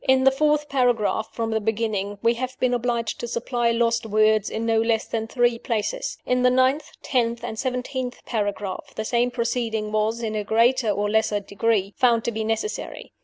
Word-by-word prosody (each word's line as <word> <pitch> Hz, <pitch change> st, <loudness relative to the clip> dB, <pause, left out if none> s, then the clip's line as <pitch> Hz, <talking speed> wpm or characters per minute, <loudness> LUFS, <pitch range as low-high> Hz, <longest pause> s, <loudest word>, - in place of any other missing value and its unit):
In 260 Hz, 0 st, +4 dB
the 270 Hz, -, +6 dB
fourth 300 Hz, +1 st, +1 dB
paragraph 245 Hz, -5 st, +1 dB
from 225 Hz, -1 st, -3 dB
the 220 Hz, -, +1 dB
beginning 210 Hz, -2 st, -1 dB
we 230 Hz, -, +4 dB
have 255 Hz, +2 st, -5 dB
been 250 Hz, -1 st, +2 dB
obliged 235 Hz, -2 st, -1 dB
to 240 Hz, -, -4 dB
supply 235 Hz, 0 st, -1 dB
lost 230 Hz, 0 st, +1 dB
words 215 Hz, -1 st, +2 dB
in 225 Hz, +1 st, -3 dB
no 225 Hz, -1 st, +3 dB
less 225 Hz, -1 st, +1 dB
than 225 Hz, -1 st, -3 dB
three 240 Hz, -1 st, +1 dB
places. 240 Hz, -, -2 dB
In 250 Hz, 0 st, +1 dB
the 250 Hz, -, +5 dB
ninth, 260 Hz, +4 st, +2 dB
tenth, 235 Hz, -3 st, 0 dB
and 220 Hz, -, -5 dB
seventeenth 255 Hz, -1 st, -3 dB
paragraphs 205 Hz, -3 st, -3 dB
the 220 Hz, -, -3 dB
same 240 Hz, +2 st, +1 dB
proceeding 230 Hz, -3 st, -2 dB
was, 215 Hz, +2 st, 0 dB
in 220 Hz, -1 st, -2 dB
a 210 Hz, -1 st, -1 dB
greater 230 Hz, +3 st, +3 dB
or 205 Hz, 0 st, 0 dB
less 220 Hz, +1 st, +2 dB, 0.2 s
degree, 200 Hz, -1 st, 0 dB
found 235 Hz, -3 st, +3 dB
to 235 Hz, -, -1 dB
be 220 Hz, 0 st, -3 dB
necessary. 225 Hz, -, -4 dB
230 Hz, 190 wpm, -24 LUFS, 220-250 Hz, 0.2 s, the